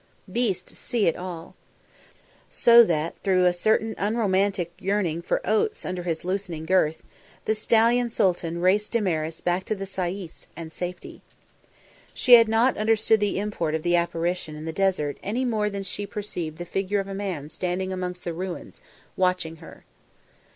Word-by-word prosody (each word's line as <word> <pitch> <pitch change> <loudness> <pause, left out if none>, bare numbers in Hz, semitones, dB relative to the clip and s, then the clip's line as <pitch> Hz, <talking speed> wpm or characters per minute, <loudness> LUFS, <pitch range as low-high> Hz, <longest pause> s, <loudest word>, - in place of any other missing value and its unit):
Beasts 195 -5 -1
see 235 -5 0
it 165 - +3
not - - -10
at - - -6
all. 170 -2 -8 0.9
So 235 0 +7
that 165 -4 0
through 185 -2 +3
a 180 - +4
certain 220 +4 +1
unromantic 195 -4 +1
yearning 185 -5 0
for - - -1
oats 220 - 0
under 185 -1 -3
his 170 -1 -3
loosening 180 -4 -3
girth, 160 -3 +2 0.4
the 220 - +2
stallion 230 +3 +3
Sooltan 175 -5 0
raced 205 +5 +2
Damaris 165 -8 -1
back 175 +1 0
to 215 - -1
the 195 -1 -5
sayis 185 -2 -5
and 165 -1 -8
safety. 180 0 -6 0.9
She 250 - +4
had 230 -2 +9
not 230 +4 +3
understood 220 0 +3
the 205 -2 0
import 195 -6 -2
of 160 - -3
the 175 0 +2
apparition 170 -1 -1
in 155 +1 -8
the 160 - -4
desert 185 -6 0
any 235 +6 -1
more 215 -3 0
than 200 -1 -5
she 200 +1 -5
perceived 180 -7 -5
the 175 - -6
figure 195 +3 -1
of 195 - -3
a 195 - -5
man 185 -7 -4
standing 185 +2 -2
amongst 180 -1 -4
the 170 - -3
ruins, 180 +1 -6 0.3
watching 180 -3 0
her. 160 - -13
185 Hz, 170 wpm, -25 LUFS, 170-210 Hz, 0.9 s, had